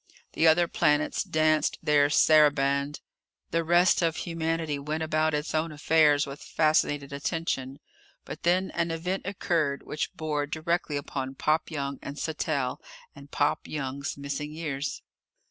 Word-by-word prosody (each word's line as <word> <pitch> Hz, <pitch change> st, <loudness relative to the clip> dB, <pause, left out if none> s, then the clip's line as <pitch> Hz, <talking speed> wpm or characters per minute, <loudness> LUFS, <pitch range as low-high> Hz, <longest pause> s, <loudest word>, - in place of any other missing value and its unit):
The 160 Hz, -, +3 dB
other 170 Hz, +2 st, +5 dB
planets 150 Hz, -1 st, +1 dB
danced 155 Hz, 0 st, +1 dB
their 145 Hz, -1 st, +4 dB
saraband. 145 Hz, -2 st, +3 dB, 0.5 s
The 165 Hz, 0 st, +1 dB
rest 175 Hz, +3 st, +4 dB
of 165 Hz, -2 st, +1 dB
humanity 165 Hz, -3 st, -2 dB
went 155 Hz, +3 st, -3 dB
about 155 Hz, 0 st, +1 dB
its 150 Hz, +1 st, -3 dB
own 160 Hz, +1 st, 0 dB
affairs 150 Hz, -1 st, +3 dB
with 140 Hz, 0 st, -9 dB
fascinated 145 Hz, -3 st, +1 dB
attention. 140 Hz, -3 st, -3 dB, 0.5 s
But 155 Hz, -, -8 dB
then 185 Hz, +2 st, +1 dB
an 170 Hz, 0 st, -1 dB
event 180 Hz, +4 st, -3 dB
occurred 165 Hz, -7 st, -1 dB
which 150 Hz, -, -3 dB
bore 150 Hz, -2 st, -2 dB
directly 160 Hz, 0 st, -1 dB
upon 135 Hz, -2 st, -5 dB
Pop 155 Hz, +3 st, 0 dB
Young 140 Hz, -3 st, -4 dB
and 140 Hz, -, -7 dB
Sattell 150 Hz, -5 st, -2 dB, 0.4 s
and 140 Hz, 0 st, -13 dB
Pop 145 Hz, 0 st, 0 dB
Young's 140 Hz, -1 st, -4 dB
missing 140 Hz, +1 st, -4 dB
years. 150 Hz, -3 st, -4 dB
155 Hz, 140 wpm, -27 LUFS, 140-160 Hz, 0.5 s, other